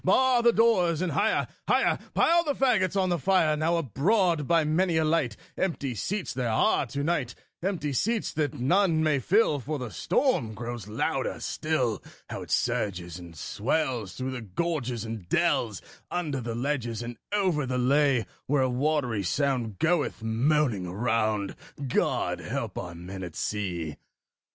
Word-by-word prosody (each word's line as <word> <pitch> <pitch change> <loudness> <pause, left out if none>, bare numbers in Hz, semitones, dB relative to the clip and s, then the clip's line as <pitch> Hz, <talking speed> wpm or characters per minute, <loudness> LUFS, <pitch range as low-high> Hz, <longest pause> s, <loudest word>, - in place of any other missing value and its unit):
Bar 255 +5 +4
the 235 0 +5
doors, 190 -9 +3
and 180 - -1
higher, 205 +10 +1 0.2
higher - - +3 0.2
Pile 340 +1 +4
the 290 -4 -1
faggots 200 -7 +2
on 185 -1 +2
the 175 -1 +1
fire: 165 -2 +3
Now 160 +3 +1
abroad, 165 - +1
by 165 -2 +4
many 165 +3 +2
a 160 - +3
light, 155 -9 +1 0.2
Empty 145 -8 -1
seats 185 - -3
there 125 -2 -1
are 110 +4 +2
to 140 +4 -3
night 145 -7 -1 0.3
Empty 170 -6 -1
seats 220 - 0
that 150 -1 -1
none 165 +4 +3
may 150 -3 +2
fill, 170 - +3
For 150 +4 -3
the 125 -5 -5
storm 140 - +1
grows 120 -1 -6
louder 105 - -1
still: 130 -9 -1 0.3
How - - -4
it - - -9
surges 90 -4 -1
and 85 -1 -11
swells 115 - -1
through 130 +1 -3
the 130 -2 -5
gorges 125 - -2
and 110 -6 -7
dells, 145 - +1 0.3
Under 150 -7 -2
the 115 -1 -4
ledges 120 -3 -2
and 120 0 -6 0.2
over 185 -9 +1
the 125 0 -1
lea, 135 -2 +3 0.2
Where 140 -1 +3
a 130 - +1
watery 125 -4 0
sound 120 0 0
goeth 160 - 0
moaning 115 -3 +1
around 110 0 0 0.3
God 125 - 0
help - - -4
our 85 -1 -5
men 90 +3 -8
at 85 -4 -7
sea! 85 -8 -3
140 Hz, 160 wpm, -27 LUFS, 115-170 Hz, 0.3 s, the